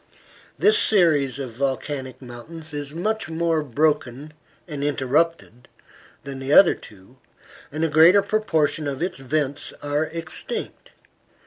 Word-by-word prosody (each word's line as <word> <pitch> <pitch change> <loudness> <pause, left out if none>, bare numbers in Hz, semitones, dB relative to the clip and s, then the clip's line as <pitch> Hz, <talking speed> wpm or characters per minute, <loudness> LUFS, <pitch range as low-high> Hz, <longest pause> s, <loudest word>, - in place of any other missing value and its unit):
This 435 +1 +5
series 155 -10 +3
of 135 -4 -5
volcanic 130 +1 -4
mountains 155 +6 -10
is 145 -1 -5
much 215 +4 -2
more 165 -1 0
broken 150 0 -1 0.3
and 145 -4 -5
interrupted 145 -2 -1 0.6
than 140 -1 -7
the 135 +1 -4
other 175 +4 +7
two, 105 +6 -16 0.5
and 155 +3 -3
a - - +2
greater 165 +6 +6
proportion 160 -8 0
of 140 +2 -3
its 180 - -3
vents 140 +1 -2
are 145 +2 0
extinct. 165 0 -4
150 Hz, 125 wpm, -23 LUFS, 135-165 Hz, 0.6 s, other